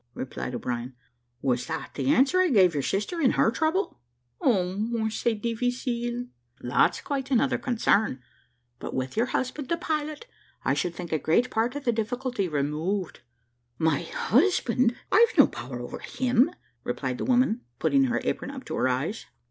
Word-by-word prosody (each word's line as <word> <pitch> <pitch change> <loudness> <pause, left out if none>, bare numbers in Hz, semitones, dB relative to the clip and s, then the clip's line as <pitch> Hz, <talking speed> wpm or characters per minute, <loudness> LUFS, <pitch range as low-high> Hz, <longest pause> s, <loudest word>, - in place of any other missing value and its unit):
replied 125 -1 -5
O'Brien; 120 +1 -4 0.5
"was 125 -2 0
that 160 0 -4
the - - -1
answer 295 +7 +4
I 370 - +4
gave 190 - +5
your 145 - 0
sister 210 - -1
in 265 - +4
her 225 - +3
trouble?" 325 - 0 0.4
"Au 185 -8 +2
moins 220 +1 -1
c'est 235 -2 +1
difficile." 240 +1 -2 0.3
"That's 125 +1 +2
quite 270 -2 -3
another 250 -4 +2
concern; 220 - +1 0.6
but - - -6
with 130 0 -3
your 235 +3 +2
husband 260 +3 -3
a 335 - +2
pilot 310 +2 -3 0.4
I - - +3
should 175 -1 -1
think 175 -1 -7
a 155 - +1
great 200 +13 +2
part 230 +4 0
of 290 - -4
the 240 - +4
difficulty 240 -1 -2
removed." 155 +3 -2 0.6
"My 160 -3 +2
husband! 250 - +2 0.2
I've 460 +3 +5
no - - +9
power - - -6
over - - -6
him," 250 0 +2 0.3
replied 125 0 -3
the - - -2
woman, 250 -2 +2 0.2
putting 275 - +3
her 240 - 0
apron - - -2
up 270 -2 -8
to - - -4
her 130 - +2
eyes. 140 - -2
235 Hz, 165 wpm, -27 LUFS, 165-265 Hz, 0.6 s, no